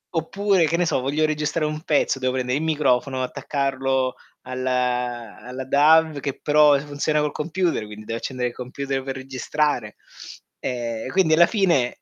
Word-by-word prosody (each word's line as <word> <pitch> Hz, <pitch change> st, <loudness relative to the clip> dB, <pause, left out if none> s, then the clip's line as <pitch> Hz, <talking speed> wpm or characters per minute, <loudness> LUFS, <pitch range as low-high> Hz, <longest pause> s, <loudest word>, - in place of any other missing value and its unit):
oppure, 190 Hz, +2 st, +2 dB
che 170 Hz, -, 0 dB
ne 175 Hz, -, +2 dB
so, 160 Hz, -, +1 dB
voglio 145 Hz, +4 st, +1 dB
registrare 155 Hz, +1 st, -1 dB
un 155 Hz, 0 st, -4 dB
pezzo, 145 Hz, -4 st, +1 dB
devo 130 Hz, -1 st, 0 dB
pendere 125 Hz, +1 st, 0 dB
i -, -, -4 dB
microfono, 135 Hz, -4 st, +1 dB
attaccarlo 135 Hz, -1 st, -1 dB, 0.3 s
alla 125 Hz, -2 st, -2 dB
alla 125 Hz, +3 st, -6 dB
DAW 155 Hz, +2 st, +4 dB
che 140 Hz, -1 st, -4 dB
però 150 Hz, -1 st, +5 dB
funziona 150 Hz, +1 st, -1 dB
col 150 Hz, -1 st, 0 dB
computer, 165 Hz, -, -1 dB
quindi 105 Hz, 0 st, -10 dB
devo 115 Hz, +1 st, -3 dB
accendere 125 Hz, 0 st, -2 dB
il -, -, -12 dB
computer 135 Hz, +2 st, -4 dB
per 135 Hz, 0 st, -4 dB
registrare. 130 Hz, -2 st, -2 dB, 0.6 s
Ehm, 120 Hz, -2 st, -3 dB
quindi 180 Hz, 0 st, +3 dB
alla 170 Hz, +2 st, +7 dB
fine 175 Hz, -, +1 dB
135 Hz, 160 wpm, -23 LUFS, 125-155 Hz, 0.6 s, alla